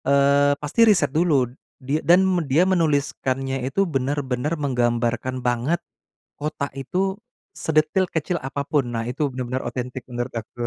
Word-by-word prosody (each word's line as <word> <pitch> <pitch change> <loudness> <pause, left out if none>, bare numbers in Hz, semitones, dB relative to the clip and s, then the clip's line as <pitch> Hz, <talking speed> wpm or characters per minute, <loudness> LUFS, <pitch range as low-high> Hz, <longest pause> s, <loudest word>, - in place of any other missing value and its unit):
Eee, 140 +1 +4
pasti 150 +11 -1
riset 205 - +3
dulu 155 -5 +3 0.3
dia 140 +3 -2
dan 180 +3 +5 0.2
dia 155 +7 +4
menuliskannya 140 -6 0
itu, 135 +9 +1
benar-benar 135 -2 -1
menggambarkan 125 -1 -1
banget 125 +7 +1 0.6
kota 145 -1 -2
itu, 185 +8 -1 0.4
sedetail 160 +4 +1
kecil 160 +2 -1
apapun. 140 +1 -1
Nah, 115 - -1
itu 140 +3 -1
benar-benar 130 0 -3
otentik 125 +1 -5
menurut 120 +1 -3
aku. 110 - -14
140 Hz, 130 wpm, -23 LUFS, 125-155 Hz, 0.6 s, dan